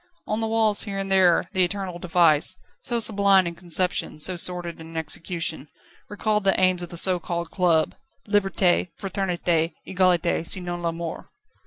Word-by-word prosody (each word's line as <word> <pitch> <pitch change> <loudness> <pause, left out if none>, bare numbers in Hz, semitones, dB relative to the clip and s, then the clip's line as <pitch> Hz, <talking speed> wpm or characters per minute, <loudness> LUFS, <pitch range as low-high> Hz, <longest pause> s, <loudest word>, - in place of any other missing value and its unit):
On 215 - -2
the 225 - -1
walls 220 -2 +2
here 200 -2 -4
and 195 0 -3
there 180 -3 +3
the 185 - +2
eternal 185 -1 -4
device, 170 -1 +3 0.3
so 240 -1 -1
sublime 200 -4 +3
in 170 - -4
conception, 180 0 0
so 180 +4 0
sordid 175 -1 0
in 165 0 -10
execution, 160 -1 -3 0.4
recalled 210 0 -1
the 195 -1 +2
aims 185 -1 +2
of 175 - -7
the 170 - -3
so 180 +1 +3
called 170 0 -5
club: 170 -4 +1 0.3
"Liberté, 195 -3 +1
Fraternité, 175 -4 -1
Egalité, 180 -3 +1
sinon 175 0 -1
la 170 -1 -1
Mort." 165 -1 -7
180 Hz, 160 wpm, -23 LUFS, 170-195 Hz, 0.4 s, there